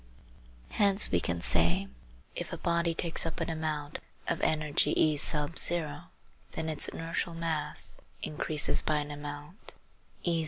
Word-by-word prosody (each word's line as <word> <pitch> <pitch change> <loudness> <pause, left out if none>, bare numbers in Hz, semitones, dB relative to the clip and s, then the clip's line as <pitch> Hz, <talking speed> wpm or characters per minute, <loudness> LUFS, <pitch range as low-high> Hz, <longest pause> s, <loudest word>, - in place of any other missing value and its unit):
Hence 200 -1 +6
we 90 - +3
can 85 0 -2
say: 85 +4 +4 0.5
If - - -5
a - - -4
body 170 -1 +1
takes 165 0 -1
up 165 - -4
an 165 0 -1
amount 155 -2 -3 0.3
of 170 - -1
energy 155 -2 +1
E, 155 -1 +4
then 160 +1 -2
its 155 - -1
inertial 165 +1 -3
mass 165 -2 -1 0.2
increases 150 0 0
by 155 - 0
an 150 0 -3
amount 145 +5 -8 0.5
eq. 170 -2 +2
155 Hz, 130 wpm, -30 LUFS, 145-165 Hz, 0.5 s, Hence